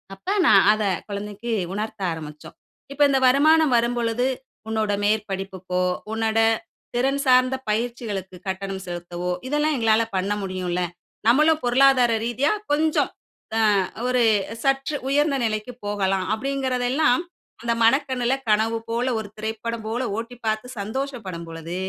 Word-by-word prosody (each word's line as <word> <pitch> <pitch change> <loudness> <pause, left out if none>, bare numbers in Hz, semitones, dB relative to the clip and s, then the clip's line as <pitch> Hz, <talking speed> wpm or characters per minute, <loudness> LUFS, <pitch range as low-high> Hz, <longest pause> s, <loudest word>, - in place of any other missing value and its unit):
அப்ப, 195 - -32 0.2
நான் - - +7
அத 215 0 -2 0.3
குழந்தைக்கு 205 +3 -5 0.2
உணர்த்த 215 +1 -4
ஆரம்பிச்சோம். 150 -2 -9 0.4
"இப்ப, 285 - -5
இந்த 270 - +3
வருமானம் 305 +2 +5
வரும்பொழுது, 235 0 0 0.4
உன்னோட 220 -2 0
மேற்படிப்புக்கோ, 195 -3 -1 0.3
உன்னோட 225 0 0 0.6
திறன் 270 +3 +1
சார்ந்த 255 0 +4
பயிற்சிகளுக்கு 215 -4 -3
கட்டணம் 190 0 -4
செலுத்தவோ, 175 0 -4 0.2
இதெல்லாம் 295 +2 +1
எங்களால 225 -1 +3
பண்ண 195 +2 0
முடியும்ல. 185 -2 -2 0.5
நம்மளும் 305 +6 +4
பொருளாதார 250 -1 +5
ரீதியா 240 +5 +1 0.2
கொஞ்சம் 310 +1 +2 0.5
ஆ - - +3 0.5
ஒரு 250 -1 +2 0.4
சற்று 270 +2 +1
உயர்ந்த 290 +1 +2
நிலைக்கு 215 +2 -2
போகலாம்." 195 -2 0
அப்பிடிங்கிறதெல்லாம் 260 +2 +1 0.4
அந்த 235 0 +1
மனக்கண்ணுல 260 0 +2
கனவு 220 +2 +2
போல, 235 +2 0
ஒரு 215 - -6
திரைப்படம் 220 +1 -4
போல 235 +3 -2
ஓட்டி 230 +2 -5
பார்த்து 220 +2 -1
சந்தோசப்படும் 215 -5 -4
பொழுது, 165 +1 -7
230 Hz, 120 wpm, -23 LUFS, 200-260 Hz, 0.6 s, நான்